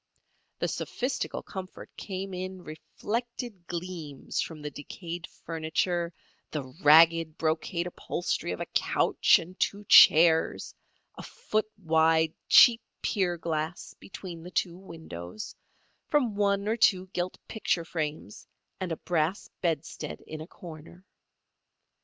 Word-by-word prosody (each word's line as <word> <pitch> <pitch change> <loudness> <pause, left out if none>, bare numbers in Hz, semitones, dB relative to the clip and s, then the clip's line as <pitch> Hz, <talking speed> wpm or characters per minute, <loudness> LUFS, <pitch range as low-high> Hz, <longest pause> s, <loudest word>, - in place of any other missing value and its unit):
The - - -1
sophistical 255 +2 -3
comfort 185 -1 -9
came 195 -1 -5
in 185 0 -5
reflected 220 +4 -5
gleams 170 -5 -4
from 160 -2 -6
the 150 - -4
decayed 170 +4 -7 0.2
furniture, 170 +1 -1 0.4
the 150 -3 -3 0.2
ragged 160 +1 +6
brocade 165 +2 -1
upholstery 175 - -3
of 90 - -4
a - - -2
couch - - +3
and 180 +3 -9
two 205 +1 0
chairs, 160 0 +6 0.4
a - - -10
foot 215 0 -2
wide 160 -3 +3 0.2
cheap 230 -1 +8 0.2
pier 180 -4 0
glass 160 0 -3
between 180 -3 -9
the 175 - -9
two 175 -1 -1
windows, 110 - -9 0.5
from 265 -8 +2
one 200 0 +1
or 225 +2 +1
two 190 -4 +4
gilt 180 +1 -2
picture 180 -6 -1
frames 155 - -5 0.3
and 185 -2 -3
a 165 - -2
brass 170 +2 -1
bedstead 160 -2 -3
in 155 0 -7
a 155 - -8
corner. 175 +1 -12
170 Hz, 125 wpm, -28 LUFS, 160-190 Hz, 0.5 s, cheap